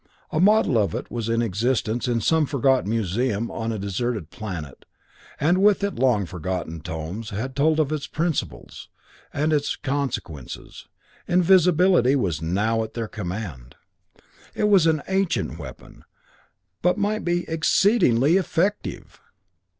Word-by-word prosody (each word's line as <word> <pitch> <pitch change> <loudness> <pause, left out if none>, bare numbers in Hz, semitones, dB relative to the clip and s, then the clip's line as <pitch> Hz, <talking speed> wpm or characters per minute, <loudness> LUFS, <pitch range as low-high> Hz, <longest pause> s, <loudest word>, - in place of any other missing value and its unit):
A 155 - 0
model 195 - +4
of 105 +1 0
it 120 - -6
was 115 -2 -3
in 115 +1 +1
existence 115 +3 -1
in 120 -2 0
some 160 +2 +2
forgotten 135 -5 +1
museum 115 +1 -1
on 115 0 -3
a 110 - -3
deserted 100 -2 -3
planet, 90 - -7 0.6
and 175 +5 +3
with 205 0 +4
it 200 - 0
long 120 -6 +2
forgotten 90 -1 -4
tomes 80 +9 -6
that 125 +6 -4
told 155 +3 +2
of 155 -2 +1
its 155 -2 -3
principles, 165 -1 -3 0.4
and 155 +2 0
of - - +5
its 145 - -2
consequences. 135 - -5 0.4
Invisibility 180 -5 +4
was 90 - -1
now 105 +7 0
at 110 - -9
their 115 -2 -3
command. 90 - -6 0.8
It 210 - +1
was 190 -5 +5
an 155 -3 +1
ancient 190 - -1
weapon, 65 -5 -11 0.8
but 180 +3 +2
might 210 +1 -1
be 175 0 -1
exceedingly 160 - +3
effective! 195 +2 -2
125 Hz, 140 wpm, -23 LUFS, 105-160 Hz, 0.8 s, of